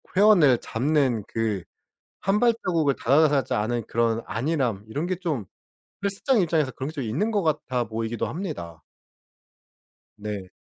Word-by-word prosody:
회원을 180 - +6
잡는 130 -3 0
그 110 -5 -2 0.6
1 195 +2 +1
발자국을 185 - +2
다가가지 140 0 +3
않은 115 +2 -1
그런 115 0 +1
안일함 120 -3 -1
이런 145 +8 -2
게 185 - 0
좀 150 - -2 0.6
헬스장 200 +5 +1
입장에서 160 -6 +1
그런 135 +4 -5
게 145 -4 -5
있는 145 - 0
것 205 -3 +1
같아 140 -6 0
보이기도 115 +1 -3
합니다. 115 - -6 1.3
네. 105 -3 -6
135 Hz, 270 characters per minute, -25 LUFS, 115-165 Hz, 1.3 s, 회원을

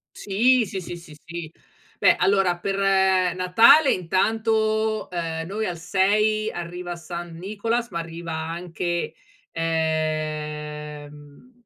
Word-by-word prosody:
Sì, 235 +5 +3
sì, 190 0 -5
sì, 175 0 -7
sì, 165 -3 -13
sì. 165 -1 -7 0.5
Beh - - +5
allora 190 -3 +2
per 195 +2 -2
Natale 190 - +5
intanto, 220 +3 0
ehm, 165 -2 -3
noi 215 +3 -3
al 175 -2 -4
6 210 +5 +2
arriva 175 0 -6
San 170 0 -7
Nicolas, 225 +5 -2
ma 170 -1 -3
arriva 165 0 -6
anche, 170 +1 -3 0.4
ehm, 150 - -3
175 Hz, 110 wpm, -24 LUFS, 165-205 Hz, 0.5 s, Beh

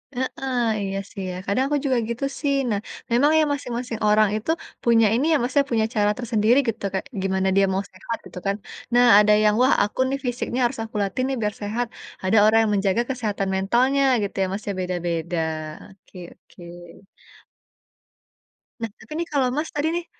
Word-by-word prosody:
Heeh. 260 0 -3 0.3
Iya 195 0 -3
sih 195 - -7
ya, - - -6
kadang 225 +6 +1
aku 295 0 +1
juga 260 -2 +2
gitu 235 +4 -2 0.2
sih. 280 -2 +1
Nah, 205 -2 0 0.3
memang 280 +6 +4
ya - - +4
masing-masing 245 -4 -4
orang 215 0 +5
itu, 225 +9 -2 0.3
punya 230 -2 +4
ini 270 +5 +1
ya - - +5
Mas 245 +1 -2
ya, - - +4
punya 220 -1 +2
cara 210 0 +3
tersendiri 230 0 +2
gitu 225 - -3
kayak 190 - -3 0.2
gimana 190 0 0
dia 195 0 +5
mau 195 +1 -1
sehat 225 +4 -5
gitu 180 - -9
kan. 200 - +1 0.4
Nah 245 0 +6
ada 210 0 +4
yang, 210 - +5
"wah 260 - +5
aku 210 - -5
nih 275 - -1
fisiknya 245 +1 -2
harus 235 - -2
aku 220 -1 -11
latih 200 +6 -2
nih 270 - -1
biar 210 -1 -1
sehat". 225 +4 -2 0.4
Ada 195 +4 +2
orang 220 +1 +5
yang 210 - 0
menjaga 195 +3 +1
kesehatan 210 -6 -2
mentalnya 250 +8 +2 0.2
gitu 200 - -4
ya - - +3
Mas 205 +2 -4
ya, - - -1
beda-beda. 175 -1 -2 0.6
Oke 195 - -29 0.2
oke. 175 - -18 2.2
Nah 230 - -1
tapi 225 - -17
nih 340 - -2
kalau 265 -3 +2
Mas 315 +1 -1
tadi 295 +2 0
nih, 345 -1 -3
225 Hz, 190 wpm, -23 LUFS, 200-255 Hz, 2.2 s, Nah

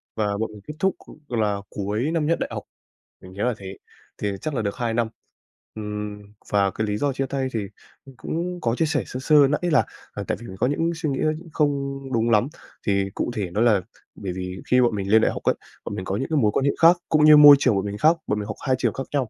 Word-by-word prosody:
và 105 -2 -1
bọn 110 0 -2
mình 105 -1 -12
kết 150 - -5
thúc 190 +2 +1 0.3
là 110 -4 0
cuối 105 +8 -2
năm 165 -2 0
nhất 165 +2 +1
đại - - -2
học, - - -5 0.6
mình 95 - -12
nhớ 100 +2 -3
là 125 -1 +1
thế. 95 -1 -8 0.4
Thì 105 -1 -1
chắc 155 - -3
là 115 - -1
được 100 -1 -3
2 115 -2 -2
năm. 115 -1 +1 0.7
Ừm, 105 -1 -5 0.3
và 100 -1 +3
cái 110 -1 -2
lý 105 - -1
do 140 +3 0
chia 135 +1 -1
tay 135 0 -2
thì 110 - 0 0.6
cũng 175 +2 -4
có 115 0 0
chia 160 - +1
sẻ 155 -1 0
sơ 130 - -6
sơ 145 +1 +5
nãy 150 - -1
là 145 - +4 0.4
tại - - -1
vì 120 - -9
mình 95 - -9
có - - +2
những 165 +5 0
suy 160 -2 -2
nghĩ 135 - -2 0.3
không 140 -2 0
đúng 115 0 +1
lắm. 110 +2 +3 0.4
Thì 100 -1 +1
cụ - - -2
thể 100 -5 -2
đó 105 - 0
là 110 -5 +4 0.3
bởi 95 -3 -5
vì 90 0 -5
khi 125 0 +6
bọn 120 -3 +2
mình 100 -1 -3
lên 110 0 +6
đại - - +2
học - - -7
ấy, - - +2 0.3
bọn - - -4
mình 95 -2 -5
có 95 - -2
những 135 - -2
cái 155 - +1
mối 105 -5 +3
quan 135 - 0
hệ 140 - +4
khác, 170 +2 +7
cũng 155 -1 +4
như 150 -1 +9
môi 145 -1 +11
trường 125 -6 +3
bọn 95 +1 -1
mình 100 0 -4
khác, 160 +7 +4
bọn 105 - 0
mình 105 - -5
học 110 - -5
hai 130 - +3
trường - - +1
khác 135 - -5
nhau. 135 -5 0
115 Hz, 260 wpm, -23 LUFS, 105-145 Hz, 0.7 s, môi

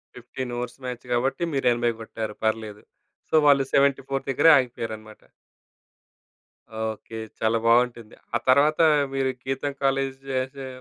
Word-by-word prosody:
15 125 +1 -6
overs 125 0 -5
match 125 0 -6
కాబట్టి, 130 +8 0
మీరు 135 -2 0
80 120 0 +1
కొట్టారు. 110 -1 -5
పర్లేదు. 110 -1 -2 0.5
సో, - - -18
వాళ్ళు 140 -1 +5
74 135 -1 +2
దగ్గరే 150 +5 +5
ఆగిపోయారన్నమాట. 110 -4 -4 1.6
ఓకె. 110 0 -5 0.2
చాలా 110 +1 +2
బాగుంటుంది. 120 -1 +2 0.2
ఆ - - +5
తర్వాత, 145 +4 +4 0.3
మీరు 135 -1 0
గీతం 135 +2 -3
కాలేజ్ 135 0 0
చేసే 130 +1 -3
125 Hz, 120 wpm, -24 LUFS, 115-135 Hz, 1.6 s, వాళ్ళు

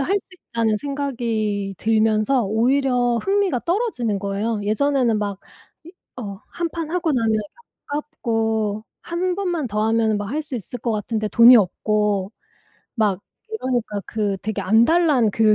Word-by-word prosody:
할 350 +8 +1
수 405 - -2 0.2
있다는 225 -2 +1
생각이 225 -7 -2
들면서 220 +3 +2
오히려 245 +3 +2
흥미가 390 - +1
떨어지는 335 - -1
거예요. 205 +3 -2
예전에는 240 +1 +1
막 205 -2 -3 0.5
이 340 - -11 0.3
어 200 -2 -7
1 340 -1 -2
판 330 -2 -4
하고 345 -2 0
나면 230 -3 +1
이게 215 - 0 0.5
아깝고 225 -8 -2 0.2
1 355 +1 -1
번만 350 -7 -2
더 210 -2 -1
하면은 225 -1 +2
뭐 205 0 -3
할 290 +9 -2
수 290 -3 -7
있을 245 +1 -5
것 235 - -2
같은데 215 +1 -2
돈이 235 +4 +8
없고 205 0 +1 0.6
막 205 -5 +1 0.3
이러니까 250 - -2
그 210 -3 -1
되게 210 +1 -3
안달 235 - +4
난 250 -8 +3
그 215 +1 +4
230 Hz, 280 characters per minute, -22 LUFS, 210-280 Hz, 0.6 s, 돈이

